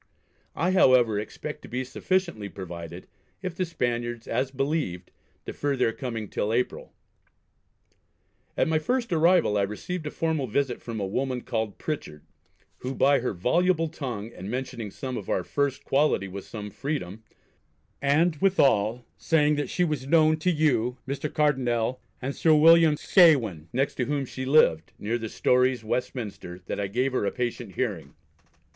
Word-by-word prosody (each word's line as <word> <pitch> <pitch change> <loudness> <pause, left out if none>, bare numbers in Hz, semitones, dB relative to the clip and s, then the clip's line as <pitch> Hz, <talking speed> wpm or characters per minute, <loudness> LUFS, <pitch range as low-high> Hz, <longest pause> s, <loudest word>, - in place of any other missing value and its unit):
I, 180 +2 +1
however, 125 - +5
expect 105 - -6
to - - -11
be 125 +2 -3
sufficiently 130 - -1
provided, 85 -2 -8 0.4
if 185 -2 -3
the 185 +2 -1
Spaniards, 120 -7 -3
as 125 +3 0
believed, 135 - -2 0.3
defer 145 -1 -2
their 115 -3 +2
coming 115 -5 -5
till 105 +2 -2
April. 120 +2 -2 1.7
At - - +2
my 160 -1 +2
first 235 +5 -1
arrival 165 - +4
I - - +2
received 150 - -4
a - - -2
formal 160 -4 -1
visit 125 +2 -1
from 115 -2 -5
a 100 - -1
woman 125 +5 -2
called 110 -4 -3
Pritchard, 110 - -5 0.6
who 130 +1 -4
by 140 0 +4
her 125 - -2
voluble 165 - +1
tongue, 120 -8 -5
and 95 +2 -8
mentioning 120 -3 -4
some 130 +4 -5
of 100 - -7
our 90 - 0
first 140 +6 -1
quality 140 -8 +2
with 95 +1 -8
some 105 -2 -7
freedom, 110 - -4 0.8
and, 155 +4 +2
withal, 125 - +2
saying 150 -2 +2
that 145 -3 -2
she 180 - 0
was 150 -6 -2
known 155 0 +5
to 155 +4 0
you, 140 -7 +1
Mr. 140 +2 -3
Cardonnel, 125 -5 +1 0.2
and 135 +2 -4
Sir 160 -2 +4
William 165 0 +6
Scawen, 120 - +4
next 135 +3 0
to 125 - 0
whom 145 0 -1
she 130 +1 -6
lived, 130 - +3
near 115 +3 -2
the 110 -1 -5
Storey's 125 0 +2
Westminster, 110 -6 -4
that - - -4
I 100 - -1
gave 125 +6 0
her 130 - 0
a 100 - 0
patient 120 -6 -4
hearing. 105 -10 -3
130 Hz, 160 wpm, -26 LUFS, 110-150 Hz, 1.7 s, William